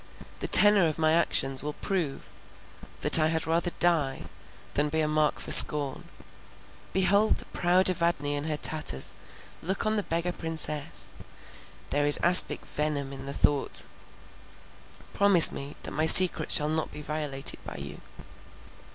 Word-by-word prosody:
The -, -, -7 dB
tenor 205 Hz, -4 st, +6 dB
of 155 Hz, -, -7 dB
my 155 Hz, -1 st, -2 dB
actions 135 Hz, -5 st, -1 dB
will 150 Hz, +1 st, -8 dB
prove 175 Hz, -8 st, -7 dB, 0.7 s
that -, -, +4 dB
I 155 Hz, -, 0 dB
had 160 Hz, 0 st, -5 dB
rather 165 Hz, +2 st, -3 dB
die, 160 Hz, -6 st, -1 dB, 0.5 s
than 150 Hz, +1 st, -3 dB
be 160 Hz, +2 st, -5 dB
a 155 Hz, -, -4 dB
mark 155 Hz, 0 st, -3 dB
for -, -, -7 dB
scorn—behold 185 Hz, +7 st, +1 dB
the -, -, -12 dB
proud 180 Hz, +2 st, -2 dB
Evadne 170 Hz, -5 st, -3 dB
in 145 Hz, +1 st, -7 dB
her 155 Hz, -1 st, -6 dB
tatters! 150 Hz, -, -5 dB, 0.5 s
look 190 Hz, +6 st, -6 dB
on 215 Hz, 0 st, -3 dB
the -, -, -3 dB
beggar 170 Hz, -1 st, -6 dB
princess! 160 Hz, -2 st, -3 dB, 0.7 s
There 145 Hz, +1 st, -3 dB
is 145 Hz, -, +7 dB
aspic 180 Hz, +1 st, +5 dB
venom 145 Hz, -2 st, -6 dB
in 135 Hz, 0 st, -12 dB
the 140 Hz, -, -8 dB
thought—promise 175 Hz, +5 st, -2 dB
me 140 Hz, +1 st, -10 dB
that -, -, -9 dB
my 155 Hz, +1 st, -4 dB
secret 185 Hz, +2 st, +7 dB
shall 150 Hz, -1 st, +2 dB
not 160 Hz, 0 st, -6 dB
be 150 Hz, -, -12 dB
violated 150 Hz, -3 st, -3 dB
by -, -, -12 dB
you." 70 Hz, +1 st, -10 dB
155 Hz, 145 wpm, -24 LUFS, 145-175 Hz, 0.7 s, is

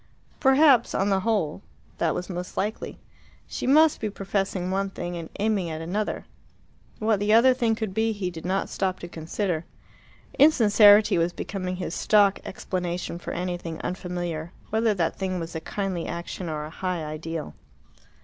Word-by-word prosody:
Perhaps, 270 Hz, -3 st, +5 dB
on 195 Hz, +1 st, +1 dB
the 195 Hz, -1 st, +2 dB
whole, 195 Hz, -6 st, -1 dB, 0.4 s
that 165 Hz, -2 st, +1 dB
was 180 Hz, -, -4 dB
most 180 Hz, -1 st, -6 dB
likely. 210 Hz, +3 st, -3 dB, 0.5 s
She -, -, -5 dB
must 305 Hz, +3 st, +5 dB
be 215 Hz, -, -1 dB
professing 195 Hz, -2 st, -2 dB
one 195 Hz, +1 st, 0 dB
thing 175 Hz, -2 st, -5 dB
and 165 Hz, -2 st, -6 dB
aiming 205 Hz, -4 st, +1 dB
at 160 Hz, -1 st, -4 dB
another. 190 Hz, +6 st, -3 dB, 0.7 s
What 215 Hz, -2 st, +1 dB
the 205 Hz, +1 st, +2 dB
other 245 Hz, +3 st, +7 dB
thing 235 Hz, -3 st, +1 dB
could 220 Hz, -4 st, -4 dB
be 225 Hz, +2 st, +1 dB
he 200 Hz, -4 st, -3 dB
did 165 Hz, -2 st, -9 dB
not 190 Hz, +2 st, -1 dB
stop 185 Hz, -1 st, -1 dB
to 175 Hz, -, -6 dB
consider. 170 Hz, +1 st, -3 dB, 0.8 s
Insincerity 210 Hz, -, +6 dB
was 170 Hz, +1 st, +1 dB
becoming 185 Hz, -2 st, -4 dB
his 180 Hz, -2 st, -4 dB
stock 205 Hz, -1 st, +3 dB
explanation 180 Hz, -2 st, -4 dB
for -, -, -7 dB
anything 175 Hz, -2 st, -4 dB
unfamiliar, 175 Hz, -3 st, -4 dB, 0.2 s
whether 220 Hz, -1 st, +2 dB
that 165 Hz, -3 st, -1 dB
thing 185 Hz, -2 st, -2 dB
was 165 Hz, 0 st, -6 dB
a 160 Hz, -, -4 dB
kindly 190 Hz, -3 st, -3 dB
action 170 Hz, +1 st, -5 dB
or 150 Hz, -1 st, -3 dB
a 155 Hz, -, -9 dB
high 180 Hz, -2 st, -3 dB
ideal. 155 Hz, +1 st, -5 dB
185 Hz, 165 wpm, -25 LUFS, 170-210 Hz, 0.8 s, other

